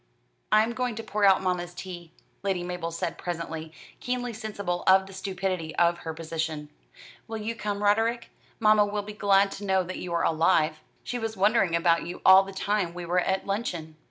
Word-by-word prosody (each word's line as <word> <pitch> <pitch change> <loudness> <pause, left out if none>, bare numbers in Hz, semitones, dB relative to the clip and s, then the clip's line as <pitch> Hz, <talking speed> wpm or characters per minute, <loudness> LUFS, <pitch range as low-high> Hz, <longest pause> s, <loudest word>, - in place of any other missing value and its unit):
"I 215 0 +6
am 235 +2 -2
going 250 -2 -2
to 225 - -5
pour 210 -1 0
out 190 -1 +5
mamma's 175 -1 -2
tea," 175 -2 -8 0.3
Lady 190 -3 -1
Mabel 175 -1 -4
said 170 0 -4
presently, 165 -2 -5 0.3
keenly 245 -1 -3
sensible 205 -5 -4
of 190 0 +6
the 195 - -12
stupidity 185 -4 -3
of 170 0 +3
her 160 - -5
position. 160 -2 -4 0.6
"Will 225 -1 -4
you 220 +1 -3
come, 205 -1 -3
Roderick? 225 +3 +1 0.3
Mamma 215 -1 +5
will 205 0 -2
be 210 +1 -8
glad 200 -1 +3
to 205 - -7
know 190 -2 +2
that 185 +1 -6
you 180 - -6
are 170 - +1
alive. 160 -1 +2 0.2
She 245 - -4
was 225 -2 -4
wondering 195 -3 +3
about 170 0 +3
you 175 - -6
all 190 0 +9
the 195 0 -7
time 195 -2 -1
we 175 -1 -5
were 175 +2 +1
at 190 +1 0
luncheon." 175 -6 -3
190 Hz, 195 wpm, -27 LUFS, 170-210 Hz, 0.6 s, all